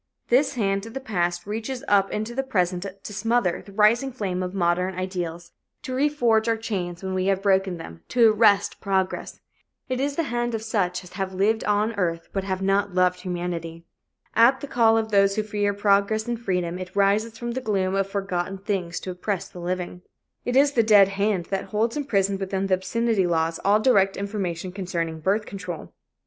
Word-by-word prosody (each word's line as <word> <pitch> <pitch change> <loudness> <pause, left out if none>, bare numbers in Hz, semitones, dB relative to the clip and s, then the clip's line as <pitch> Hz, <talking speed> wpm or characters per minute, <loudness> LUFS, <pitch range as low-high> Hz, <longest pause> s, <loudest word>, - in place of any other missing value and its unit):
This 265 +3 +3
hand 195 -4 0
of 225 - -11
the - - -2
past 175 -8 -1
reaches 225 +5 -4
up 195 -1 +3
into 215 +3 -3
the 270 - 0
present 185 -7 -1 0.2
to 205 - -7
smother 225 -3 +1
the 200 - -13
rising 220 +6 +3
flame 195 -7 -3
of 180 0 -3
modern 180 +1 +1
ideals, 175 -2 -4 0.3
to 260 -3 -5
reforge 255 -5 +2
our 230 -1 +2
chains 190 -6 -4
when 190 0 -3
we 185 0 0
have 195 0 +1
broken 190 -2 +2
them, 85 - -10
to 230 -3 +5
arrest 205 -2 +3
progress. 190 -2 -2 0.5
It 255 0 -1
is 280 +1 -1
the 330 - 0
hand 240 -1 0
of 220 - -4
such 185 -5 -1
as 180 - -14
have 190 0 -4
lived 215 +4 +2
on 210 +2 +1
earth 165 -3 -1
but 195 - -1
have 190 0 -3
not 195 0 +1
loved 180 -1 +3
humanity. 175 -2 -4 0.5
At 235 +4 +5
the - - -4
call 225 -3 +4
of 220 -1 -1
those 200 -1 +4
who 215 - 0
fear 205 -1 0
progress 205 +2 +2
and 240 -1 -3
freedom, 180 -4 -1
it 185 0 -8
rises 210 +3 +2
from 240 +1 -4
the 260 +2 -3
gloom 195 -5 0
of 195 0 0
forgotten 195 -1 -2
things 190 -3 -3
to 185 - -5
oppress 180 +1 -3
the 180 - -11
living. 180 0 -4 0.4
It 245 - -1
is 280 +1 +5
the 245 - +3
dead 205 -3 +6
hand 195 -2 0
that 195 - -1
holds 225 +2 -1
imprisoned 200 -9 0
within 195 0 -2
the 195 - +1
obscenity 210 +1 +1
laws 165 -1 0
all 205 +2 +4
direct 195 -5 +3
information 190 -3 -3
concerning 170 -4 -3
birth 200 +6 0
control. 180 -6 -7
195 Hz, 195 wpm, -24 LUFS, 185-220 Hz, 0.5 s, dead